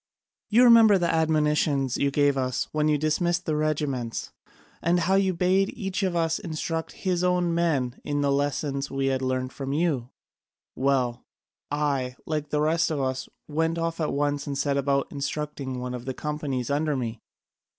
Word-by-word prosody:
You 235 +3 +5
remember 230 -4 +8
the 175 -2 +1
admonitions 150 -4 +2
you 140 - +2
gave 145 0 +2
us 130 -1 -1
when 155 0 +1
you 150 -1 +3
dismissed 170 +4 0
the 155 - 0
regiments, 145 -6 -2 0.5
and 175 +1 +2
how 185 +4 +1
you 195 -1 +3
bade 185 +2 +2
each 195 -4 -3
of 185 -3 0
us 165 -1 +1
instruct 160 0 -4
his 180 -1 +1
own 180 -1 +2
men 145 -8 0
in 145 0 -1
the 140 -1 +2
lessons 140 0 -1
we 135 0 -1
had 130 - -1
learnt 130 0 -1
from 135 0 -4
you. 145 -6 0 0.7
Well, 130 -3 0 0.5
I, 140 -4 -1
like 150 -2 -2
the 150 0 0
rest 165 +2 +2
of 155 -3 -1
us, 130 -1 -2 0.2
went 160 +2 0
off 165 0 -2
at 155 - 0
once 145 0 -1
and 140 -1 -3
set 140 0 0
about 140 0 +1
instructing 140 -2 -4
one 125 0 -4
of 125 -1 -6
the 130 -1 -4
companies 145 -4 -3
under 150 +1 +1
me. 115 -3 -4
150 Hz, 175 wpm, -26 LUFS, 135-165 Hz, 0.7 s, remember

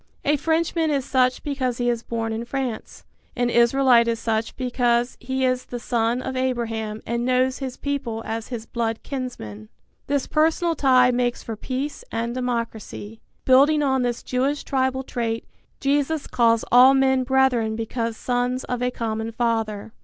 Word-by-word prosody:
A 295 +1 +3
Frenchman 325 +2 0
is 280 -3 0
such 255 -1 +1
because 260 -4 -2
he 245 - -1
is 240 -1 0
born 225 -1 -3
in 225 +1 -3
France; 250 -2 -5 0.3
an 245 -1 0
Israelite 235 0 +4
is 230 0 0
such 225 0 -2
because 245 -1 0
he 260 +1 -1
is 255 0 0
the 245 - -6
son 235 +1 0
of 265 - -4
Abraham 225 -4 -2
and 235 +1 -2
knows 255 +1 +1
his 260 -2 -5
people 265 -6 -3
as 225 0 -4
his 235 -3 -6
blood 230 -2 -3
kinsmen. 110 - -6 0.4
This 280 -1 0
personal 325 +2 +2
tie 255 -4 +4
makes 245 0 -1
for 225 - -5
peace 265 +6 -4
and 230 +1 -2
democracy. 230 -3 -4 0.2
Building 285 +4 +5
on 265 -2 +2
this 240 -1 -2
Jewish 270 +3 -1
tribal 260 -1 0
trait, 230 -3 -3 0.3
Jesus 285 +2 0
calls 230 -2 +2
all 255 +2 +8
men 265 -1 +3
brethren 255 -4 +2
because 230 0 -3
sons 250 +1 -1
of 250 -1 -3
a 250 - +1
common 225 -2 -3
Father. 225 -2 -2
250 Hz, 160 wpm, -23 LUFS, 230-265 Hz, 0.4 s, all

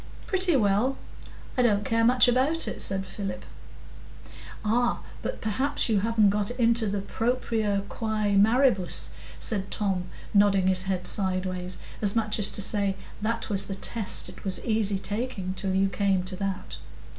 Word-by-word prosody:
"Pretty 370 -4 +2
well; 225 +3 +2 0.6
I 250 - +2
don't 210 -4 +2
care 230 0 +1
much 250 +2 +5
about 265 +7 +1
it," - - -4
said 195 0 -1
Philip. 195 -3 -6 1.2
"Ah, 240 +3 +1 0.2
but - - -5
perhaps 260 +6 0
you 215 -3 +3
haven't 215 -1 +3
got 205 0 -1
into 235 -2 +2
the 200 0 -2
Propria 220 -2 -1
quæ 215 -2 -1
maribus," 215 -2 +3 0.3
said 195 -3 0
Tom, 190 -4 -1 0.3
nodding 200 -2 +4
his 185 0 +2
head 185 -2 -2
sideways, 185 -2 +1 0.2
as 205 0 +4
much 215 -1 0
as 205 - +5
to 205 - +1
say, 200 -1 +1 0.3
"that 230 +2 -2
was 195 -1 +3
the 195 - -2
test; 210 +1 0
it - - -12
was 190 -2 +1
easy 215 -3 0
talking 205 -2 -3
till 190 0 -2
you 195 +1 +3
came 195 -1 0
to 185 +1 -4
that." 195 -1 -4
205 Hz, 155 wpm, -26 LUFS, 195-230 Hz, 1.2 s, much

